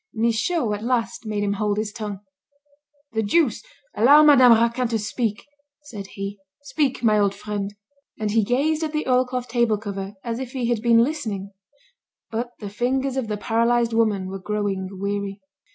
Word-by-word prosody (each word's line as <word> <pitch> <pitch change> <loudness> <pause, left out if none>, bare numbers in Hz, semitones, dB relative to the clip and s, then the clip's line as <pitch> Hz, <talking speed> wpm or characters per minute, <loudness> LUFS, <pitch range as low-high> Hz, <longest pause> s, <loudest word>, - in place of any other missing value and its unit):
Michaud 230 +3 +1
at 205 - -4
last 235 -2 -1
made 210 -1 -1
him 200 0 0
hold 205 0 -1
his 215 0 -2
tongue. 205 -3 -5 0.9
"The 220 - +1
deuce! 245 +4 +2 0.3
Allow 285 +7 +7
Madame 260 -5 +8
Raquin 235 +2 +2
to 230 -1 0
speak," 215 0 -2 0.4
said 210 -9 -8
he. 200 +1 -5 0.2
"Speak, 285 -4 -1
my 215 -2 +4
old 200 -1 +2
friend." 205 0 -4 0.4
And 215 -1 -2
he 220 0 +3
gazed 285 +8 +1
at 315 -1 -2
the 305 -2 -2
oilcloth 250 -1 +1
table 235 -3 +1
cover 200 -1 -6
as 230 0 -3
if 260 0 -6
he 245 -3 -1
had 235 -3 0
been 230 0 +5
listening. 220 -9 -3 0.8
But 235 +2 -2
the 210 - -7
fingers 260 +4 -1
of 260 -4 -2
the 210 -1 -2
paralysed 235 +2 +1
woman 215 -4 +1
were 195 +1 -6
growing 195 -1 -2
weary. 200 +1 -3
225 Hz, 170 wpm, -23 LUFS, 205-250 Hz, 0.9 s, Madame